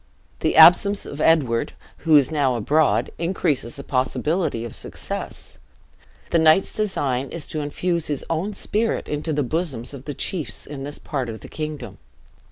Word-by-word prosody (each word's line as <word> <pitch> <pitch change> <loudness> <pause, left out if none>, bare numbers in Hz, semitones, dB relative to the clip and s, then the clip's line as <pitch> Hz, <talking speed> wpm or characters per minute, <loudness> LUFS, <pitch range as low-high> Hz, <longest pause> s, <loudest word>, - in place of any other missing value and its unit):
The - - 0
absence 200 -1 +7
of 145 - -6
Edward, 140 -8 +2 0.2
who 160 -2 +3
is 145 0 +5
now 140 -5 +1
abroad, 150 +7 +2
increases 165 -7 -1
the 140 - -7
probability 135 0 -1
of 115 - -8
success. - - -6 0.7
The 170 - +4
knight's 160 +4 +4
design 140 -11 -1
is 170 - -5
to 155 - -3
infuse 170 +3 -1
his 145 -3 -3
own 185 +6 -2
spirit 220 +3 -1
into 150 +2 -3
the 145 -1 0
bosoms 140 -4 -2
of 140 -1 -10
the 145 -1 -5
chiefs 150 - -2
in 140 -1 -8
this 145 +1 -2
part 130 -5 -4
of 110 -1 -7
the - - -10
kingdom. 145 - -6
150 Hz, 165 wpm, -22 LUFS, 130-165 Hz, 0.7 s, absence